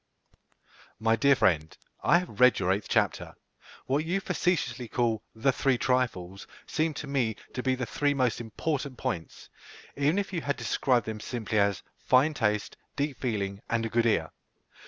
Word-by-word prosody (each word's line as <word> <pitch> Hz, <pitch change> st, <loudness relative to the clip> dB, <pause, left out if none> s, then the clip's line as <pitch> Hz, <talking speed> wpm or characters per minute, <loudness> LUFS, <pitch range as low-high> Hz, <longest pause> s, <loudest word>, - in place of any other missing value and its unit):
MY 115 Hz, +1 st, +3 dB
DEAR 140 Hz, +5 st, +4 dB
FRIEND, 80 Hz, -8 st, +1 dB, 0.3 s
I -, -, +5 dB
have 175 Hz, -, -5 dB
read 125 Hz, 0 st, +6 dB
your 95 Hz, -1 st, +1 dB
eighth 100 Hz, +2 st, -1 dB
chapter. -, -, 0 dB, 0.5 s
What 140 Hz, +3 st, +1 dB
you 175 Hz, +4 st, 0 dB
facetiously 165 Hz, -10 st, -1 dB
call 115 Hz, -2 st, 0 dB
"the 120 Hz, +5 st, +2 dB
three 135 Hz, -1 st, +1 dB
trifles" 115 Hz, -8 st, -1 dB, 0.2 s
seem 155 Hz, -1 st, -1 dB
to -, -, -5 dB
me 125 Hz, -6 st, 0 dB, 0.2 s
to 125 Hz, -, -3 dB
be 130 Hz, 0 st, +1 dB
three 145 Hz, +3 st, 0 dB
most 125 Hz, -3 st, +1 dB
important 135 Hz, +4 st, -3 dB
points, 80 Hz, -2 st, -5 dB, 0.5 s
even 145 Hz, +6 st, +2 dB
if 200 Hz, -1 st, -2 dB
you 170 Hz, -, -1 dB
had 140 Hz, -1 st, -2 dB
described 125 Hz, -5 st, +1 dB
them 110 Hz, -1 st, -5 dB
simply 110 Hz, -1 st, -2 dB
as 100 Hz, -2 st, +1 dB, 0.2 s
fine 135 Hz, +5 st, +3 dB
taste, 105 Hz, -6 st, -1 dB, 0.2 s
deep 140 Hz, -1 st, -2 dB
feeling, 100 Hz, -5 st, -2 dB
and 115 Hz, -1 st, 0 dB
a -, -, -2 dB
good 115 Hz, +1 st, +2 dB
ear. 80 Hz, -8 st, +1 dB
125 Hz, 165 wpm, -28 LUFS, 110-140 Hz, 0.5 s, read